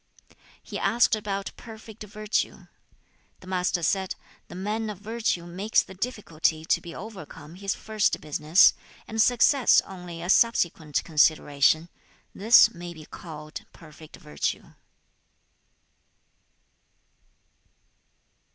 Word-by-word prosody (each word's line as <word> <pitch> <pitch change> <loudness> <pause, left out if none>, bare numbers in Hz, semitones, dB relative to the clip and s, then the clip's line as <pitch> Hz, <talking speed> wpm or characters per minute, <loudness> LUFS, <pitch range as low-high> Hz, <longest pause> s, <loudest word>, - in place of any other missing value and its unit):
He - - -6
asked 240 -1 +3
about 200 -2 -4
perfect 220 -1 -12
virtue. 215 +1 -3 0.8
The - - -14
Master 180 -2 -1
said, 190 +3 0 0.3
'The - - -11
man 215 +4 -3
of 210 - -6
virtue 215 -4 -2
makes 190 +5 0
the - - -13
difficulty 170 -7 -2
to - - +1
be 170 - -10
overcome 190 -7 -10
his 195 +2 -3
first 215 -1 -1
business, 155 +3 +4 0.3
and 225 0 0
success 245 +3 +4
only 175 -3 -9
a 175 - -5
subsequent 170 -11 +2
consideration; 155 0 +2 0.5
this 225 +5 +6
may 175 0 -9
be 155 -1 -12
called 155 -2 -9
perfect 155 -1 -14
virtue.' 75 -1 -4
185 Hz, 105 wpm, -26 LUFS, 160-215 Hz, 0.8 s, this